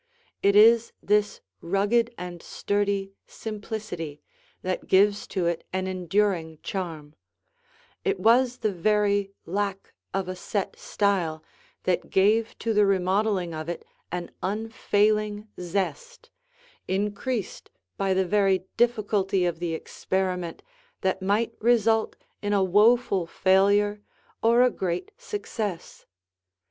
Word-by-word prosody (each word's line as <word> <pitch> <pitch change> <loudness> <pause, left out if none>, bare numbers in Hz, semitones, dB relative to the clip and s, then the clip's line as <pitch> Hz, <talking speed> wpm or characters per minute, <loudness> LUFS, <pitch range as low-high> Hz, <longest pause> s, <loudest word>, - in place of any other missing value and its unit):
It 200 0 +3
is 230 +2 +6
this 210 0 +1 0.2
rugged 205 +6 +1
and 175 -1 -7
sturdy 200 -1 -1
simplicity 205 -8 -6 0.4
that 185 0 -3
gives 200 +2 +3
to 185 -3 -2
it 170 -1 -1
an 190 0 -1
enduring 185 -3 0
charm; 160 -6 -5 0.9
it 405 -2 0
was 245 +2 +4
the 215 - +3
very 200 +1 +1
lack 195 +2 -3 0.2
of 190 -1 -2
a 185 - -4
set 195 +2 -3
style 175 -6 0 0.4
that 185 -1 0
gave 215 +4 +2
to 230 - -1
the 210 -1 +4
remodeling 190 -1 +1
of 155 +1 -5
it 175 - -5 0.3
an 175 0 -4
unfailing 210 0 0
zest, 200 - -4 0.6
increased 205 +3 -2 0.3
by 195 -1 0
the 190 0 +2
very 195 -1 +2
difficulty 205 -5 +2
of 170 -2 -1
the 170 -2 -2
experiment 180 0 -3 0.4
that 190 0 0
might 210 +4 +1
result 225 -1 +3 0.3
in 205 0 -1
a 200 -1 +3
woeful 205 -1 +3
failure 200 +3 +3 0.4
or 235 +2 +5
a 250 - +4
great 180 -4 -3
success. 225 - -5
200 Hz, 115 wpm, -26 LUFS, 185-215 Hz, 0.9 s, is